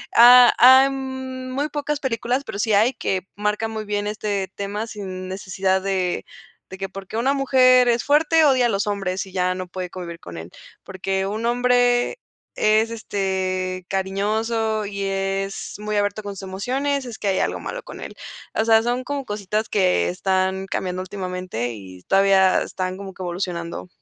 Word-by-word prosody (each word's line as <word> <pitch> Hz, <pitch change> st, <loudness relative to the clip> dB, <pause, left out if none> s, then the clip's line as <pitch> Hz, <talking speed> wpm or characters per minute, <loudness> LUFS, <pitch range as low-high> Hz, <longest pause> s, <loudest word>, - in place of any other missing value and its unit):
ha 245 Hz, +1 st, +9 dB
hay 260 Hz, +2 st, +8 dB
muy 260 Hz, +1 st, -4 dB
pocas 295 Hz, 0 st, -2 dB
películas, 250 Hz, 0 st, -1 dB
pero 200 Hz, -, -6 dB
sí 220 Hz, +1 st, 0 dB
hay 220 Hz, +6 st, +4 dB
que 190 Hz, -5 st, -2 dB
marcan 210 Hz, +2 st, -1 dB
muy 220 Hz, -1 st, -4 dB
bien 205 Hz, 0 st, -2 dB
este 205 Hz, -2 st, -2 dB
tema 205 Hz, +2 st, -4 dB
sin 185 Hz, -4 st, -7 dB
necesidad 190 Hz, 0 st, -1 dB
de 185 Hz, -2 st, -1 dB, 0.4 s
de 190 Hz, -, -8 dB
que: 195 Hz, 0 st, -4 dB
"Porque 195 Hz, +2 st, -7 dB
una 260 Hz, +4 st, +2 dB
mujer 255 Hz, -2 st, +5 dB
es 235 Hz, 0 st, +2 dB
fuerte, 310 Hz, +2 st, +4 dB
odia 260 Hz, -4 st, +4 dB
a -, -, -1 dB
los 200 Hz, -1 st, -1 dB
hombres, 195 Hz, -2 st, -2 dB
y 190 Hz, -, -13 dB
ya 185 Hz, -1 st, 0 dB
no 185 Hz, 0 st, -5 dB
puede 180 Hz, 0 st, -5 dB
convivir 175 Hz, -2 st, -7 dB
con 85 Hz, -1 st, -9 dB
él". 80 Hz, +1 st, -9 dB, 0.3 s
"Porque 190 Hz, 0 st, -2 dB
un 215 Hz, +4 st, -3 dB
hombre 245 Hz, -, +2 dB, 0.4 s
es, 215 Hz, +1 st, +3 dB
este, 185 Hz, -4 st, -2 dB
cariñoso 215 Hz, +3 st, -1 dB
y 200 Hz, 0 st, -4 dB
es 195 Hz, 0 st, -2 dB
muy 210 Hz, 0 st, -4 dB
abierto 205 Hz, +1 st, 0 dB
con 205 Hz, 0 st, -5 dB
sus 195 Hz, -, -8 dB
emociones, 260 Hz, +9 st, -2 dB
es 235 Hz, -3 st, -8 dB
que 205 Hz, -, -3 dB
hay 190 Hz, -, +1 dB
algo -, -, -1 dB
malo -, -, -6 dB
con -, -, -10 dB
él". -, -, -8 dB, 0.4 s
O 220 Hz, -, +1 dB
sea, 225 Hz, -1 st, +5 dB
son 245 Hz, +2 st, -1 dB
como 285 Hz, -1 st, -3 dB
cositas 210 Hz, +1 st, -2 dB
que 180 Hz, -, +2 dB
están 190 Hz, -, 0 dB
cambiando 185 Hz, -1 st, -3 dB
últimamente 180 Hz, -, -4 dB
y 95 Hz, -4 st, -11 dB
todavía 195 Hz, -1 st, +4 dB
están 185 Hz, 0 st, -4 dB
como 195 Hz, -1 st, -8 dB
que -, -, -11 dB
evolucionando. 175 Hz, -1 st, -4 dB
205 Hz, 175 wpm, -22 LUFS, 190-240 Hz, 0.4 s, ha